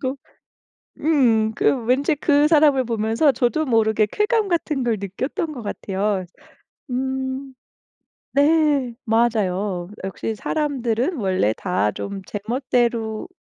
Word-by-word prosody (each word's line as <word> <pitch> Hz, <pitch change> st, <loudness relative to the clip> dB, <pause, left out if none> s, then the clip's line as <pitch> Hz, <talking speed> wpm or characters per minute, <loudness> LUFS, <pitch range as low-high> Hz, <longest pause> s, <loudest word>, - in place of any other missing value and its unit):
꼭 265 Hz, +1 st, -2 dB, 0.8 s
음 235 Hz, -8 st, +3 dB
그 250 Hz, +1 st, +1 dB
왠지 270 Hz, +6 st, +2 dB
그 290 Hz, 0 st, +3 dB
사람을 295 Hz, -4 st, +5 dB
보면서 225 Hz, +5 st, +2 dB
저도 260 Hz, +5 st, 0 dB
모르게 220 Hz, -3 st, +2 dB
쾌감 420 Hz, -1 st, +1 dB
같은 320 Hz, -5 st, -1 dB
걸 235 Hz, -2 st, +1 dB
느꼈던 255 Hz, -, -3 dB
것 245 Hz, -6 st, -7 dB
같아요. 200 Hz, -1 st, -2 dB, 0.7 s
음 265 Hz, +1 st, -3 dB, 0.8 s
네. 285 Hz, -4 st, +3 dB
맞아요. 205 Hz, -6 st, 0 dB
'역시 195 Hz, +3 st, -3 dB
사람들은 270 Hz, -, -1 dB
원래 185 Hz, -, +1 dB
다 180 Hz, -, 0 dB
좀 200 Hz, -, -6 dB
제멋대로인 235 Hz, -, -1 dB
240 Hz, 220 characters per minute, -22 LUFS, 215-285 Hz, 0.8 s, 사람을